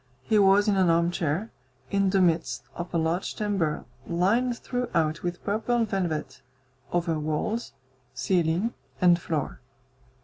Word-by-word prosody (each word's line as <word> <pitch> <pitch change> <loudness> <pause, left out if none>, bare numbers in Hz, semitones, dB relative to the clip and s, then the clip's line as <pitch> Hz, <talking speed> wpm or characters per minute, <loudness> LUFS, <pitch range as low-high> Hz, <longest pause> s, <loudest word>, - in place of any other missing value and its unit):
He 215 +7 +3
was 200 +1 +5
in 205 - +3
an 185 -2 +4
armchair, 170 +3 +1 0.4
in 195 -1 +2
the 190 0 +3
midst 165 -2 +1
of 175 +1 -6
a 170 - 0
large 165 +3 -1
chamber 195 -8 -1 0.2
lined 225 +8 +1
throughout 170 -14 -1
with 175 0 -4
purple 225 +3 +1
velvet, 160 -10 -3 0.5
over 170 -2 0
walls, 155 - -2 0.4
ceiling, 180 +4 +1 0.3
and 175 -2 +5
floor. 155 -4 -3
180 Hz, 130 wpm, -27 LUFS, 165-205 Hz, 0.5 s, was